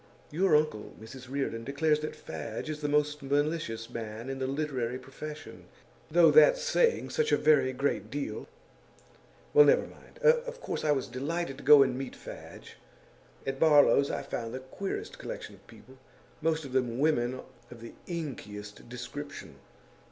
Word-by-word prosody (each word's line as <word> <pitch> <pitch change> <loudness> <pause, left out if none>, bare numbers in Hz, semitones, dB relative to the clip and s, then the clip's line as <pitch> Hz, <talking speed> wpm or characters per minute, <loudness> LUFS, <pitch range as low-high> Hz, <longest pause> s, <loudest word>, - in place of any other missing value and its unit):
Your 175 +2 +3
uncle, 150 -9 0
Mrs 125 +3 -11
Reardon, 135 -4 -2
declares 150 +4 +1
that 155 - -5
Fadge 155 - -6
is 150 0 -6
the 145 - -1
most 150 0 +1
malicious 140 -5 -1
man 115 +2 -6
in 135 - -5
the 130 - -1
literary 135 -4 -2
profession; 150 +4 -9 0.4
though - - +6
that's - - +6
saying 485 -1 +2
such 460 -1 0
a - - +5
very 150 -4 +4
great 130 -6 -1
deal 140 +3 -4 1.1
well, 445 - +9
never - - +4
mind! - - -16
Of 485 +1 +3
course - - -4
I 150 - +3
was 135 -3 +1
delighted 145 +2 -3
to - - -11
go 145 -2 +9
and 130 -2 -1
meet 135 0 -5
Fadge. - - -11 0.7
At 135 0 -3
Barlow's 145 -2 +5
I - - -3
found 115 -3 -5
the - - -4
queerest 160 +9 -6
collection - - -7
of - - -19
people, 130 +1 -16 0.4
most 160 -1 0
of 135 - -8
them 125 -2 0
women 130 -4 +1 0.3
of 120 -2 -12
the 115 - -9
inkiest 105 - -7
description. 125 +4 -8
140 Hz, 160 wpm, -29 LUFS, 125-155 Hz, 1.1 s, well